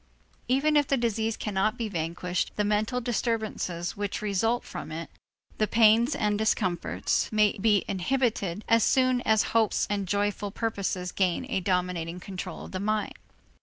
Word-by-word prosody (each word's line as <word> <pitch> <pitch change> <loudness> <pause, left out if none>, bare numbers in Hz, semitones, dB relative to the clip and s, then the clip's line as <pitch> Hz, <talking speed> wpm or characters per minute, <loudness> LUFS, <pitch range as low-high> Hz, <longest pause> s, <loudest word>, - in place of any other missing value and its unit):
Even 275 +4 +2
if 290 -2 +4
the 275 - +2
disease 225 -2 -1
cannot 210 +1 0
be 230 - -2
vanquished, 175 0 -2
the 210 - +1
mental 210 +4 0
disturbances 220 -7 -2
which 205 -1 -3
result 215 +4 0
from - - -7
it, 165 +1 -6 0.5
the 215 - +2
pains 225 +4 +4
and 210 -1 0
discomforts, 185 -5 0
may 210 -1 +3
be 205 -1 +3
inhibited, 210 -2 -1
as 230 -1 +4
soon 255 -1 +3
as 220 0 +4
hopes 225 -2 +2
and 200 -2 -1
joyful 205 +1 -1
purposes 195 -4 -2
gain 185 +5 0
a 190 - +1
dominating 180 -2 -1
control 185 0 -7
of - - -11
the 185 - -3
mind. 215 +1 -1
210 Hz, 155 wpm, -27 LUFS, 185-230 Hz, 0.5 s, if